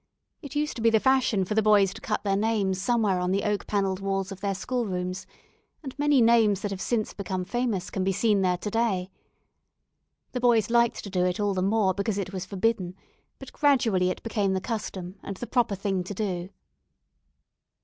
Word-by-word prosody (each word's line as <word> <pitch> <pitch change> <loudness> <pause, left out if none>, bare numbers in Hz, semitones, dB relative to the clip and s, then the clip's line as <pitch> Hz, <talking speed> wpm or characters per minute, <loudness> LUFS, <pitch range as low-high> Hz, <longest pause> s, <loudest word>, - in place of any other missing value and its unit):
It 285 -3 -9
used 300 +1 -1
to - - -5
be 230 - +5
the 220 -1 +4
fashion 255 -6 +2
for 210 - -3
the 220 - +3
boys 205 -3 +4
to - - -11
cut 210 - -2
their 195 -2 +1
names 200 -3 0
somewhere 210 -3 +1
on 180 0 -1
the 195 +2 0
oak 210 -1 -1
panelled 195 -2 0
walls 195 0 -2
of 195 - -8
their 200 -1 -1
schoolrooms, 185 -5 -3 0.6
and 265 -3 -6
many 290 -4 +4
names 225 -4 +4
that 205 - -3
have 195 -1 -5
since 225 -3 -1
become 185 -2 -4
famous 230 -4 -2
can 190 - -2
be 195 - +1
seen 205 +1 +2
there 180 -1 +2
to 210 +3 -5
day. 195 -5 0 1.2
The 250 - -3
boys 230 -3 +3
liked 235 -1 +2
to 200 - -8
do 180 -2 +1
it 180 +1 -1
all 205 -1 +1
the 185 - -1
more, 195 0 +2
because 200 +2 -2
it 195 -1 -4
was 185 -1 -5
forbidden, 195 -2 -1 0.4
but - - -11
gradually 230 -11 +2
it - - -5
became 205 -4 0
the 190 - 0
custom, 195 -3 -5
and 195 - -6
the 240 - -5
proper 240 -5 +1
thing 195 -1 -1
to 205 - -6
do. 185 -3 -3
200 Hz, 205 wpm, -26 LUFS, 190-225 Hz, 1.2 s, be